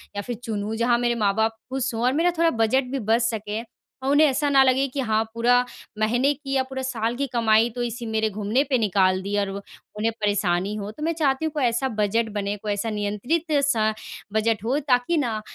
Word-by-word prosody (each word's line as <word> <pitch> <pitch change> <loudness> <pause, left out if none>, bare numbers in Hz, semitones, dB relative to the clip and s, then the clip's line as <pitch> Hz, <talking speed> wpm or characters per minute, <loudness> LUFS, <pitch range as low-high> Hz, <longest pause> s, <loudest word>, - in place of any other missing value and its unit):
या 205 - -2
फिर 245 +3 -5
चुनूँ, 215 -1 -3
जहाँ 235 +1 +2
मेरे 240 -1 +1
माँ-बाप 220 +1 +1
खुश 260 -1 -2
हों 225 +1 -2
और 255 - +3
मेरा 335 +4 +2
थोड़ा 335 0 +4
बजट 260 +4 +2
भी 275 - -1
बच 225 +2 +2
सके 220 -2 -2 0.4
और 270 - +1
उन्हें 300 +2 +6
ऐसा 285 +2 +1
ना 270 -1 +6
लगे 265 +1 +3
कि, 270 +2 -6
"हाँ, 220 -3 +1
पूरा 245 +2 +3 0.3
महीने 245 +6 +2
की 275 -1 -7
या 265 - +2
पूरा 265 0 -6
साल 240 -2 -2
की 280 +2 -2
कमाई 225 -1 +3
तो 245 - -2
इसी 240 0 -4
मेरे 220 0 0
घूमने 215 +5 0
पे 260 - +3
निकाल 190 -3 +2
दी।" 200 +2 -2
और 200 -1 -1
व 200 +1 -6 0.4
उन्हें 225 +2 +1
परेशानी 200 -1 0
हो, 205 0 -5
तो 300 +8 -9
मैं 335 - +1
चाहती 295 -2 0
हूँ, 315 - -1
कोई 295 - -1
ऐसा 240 +2 +1
बजट 220 +2 +1
बने, 200 +1 -2
कोई 210 +1 -4
ऐसा 215 +3 -2
नियंत्रित-सा 225 +3 0 0.4
बजट 220 -1 +1
हो, 255 +6 +1
ताकि 270 +3 +1
ना, 230 -7 -1
235 Hz, 220 wpm, -24 LUFS, 215-265 Hz, 0.4 s, उन्हें